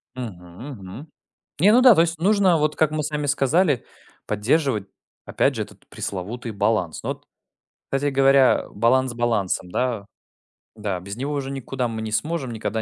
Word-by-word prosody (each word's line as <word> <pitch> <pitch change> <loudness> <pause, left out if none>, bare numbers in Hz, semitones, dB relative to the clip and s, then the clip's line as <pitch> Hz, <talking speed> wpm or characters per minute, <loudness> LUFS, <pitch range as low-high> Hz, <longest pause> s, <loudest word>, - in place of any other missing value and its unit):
Мгм 95 -1 -8
мгм. 115 - -10 0.5
Не 205 +4 +6
ну 250 - +6
да, 250 -4 +9
то - - +3
есть 165 -1 -1
нужно, 190 -1 +3
вот 150 0 0
как 155 -2 +2
мы 155 0 -2
с 150 - -3
вами 150 -1 -2
сказали, 145 +1 +2 0.4
поддерживать 110 0 0 0.4
опять - - +1
же - - -1
этот - - -13
пресловутый 110 +5 -5
баланс, 100 -5 0
но - - -3
вот - - -7 0.7
Кстати 140 +1 +1
говоря, 135 -1 +4
баланс 125 +4 +2
балансом, 110 -6 -1
да. 120 -2 -1 0.7
Да, 100 -4 -3
без 100 +2 -7
него 140 +4 -3
уже 135 -2 -3
никуда 135 -1 -3
мы 110 -1 -4
не 110 -1 -4
сможем, 155 +2 -1
никогда 110 0 -3
130 Hz, 170 wpm, -23 LUFS, 110-150 Hz, 0.7 s, да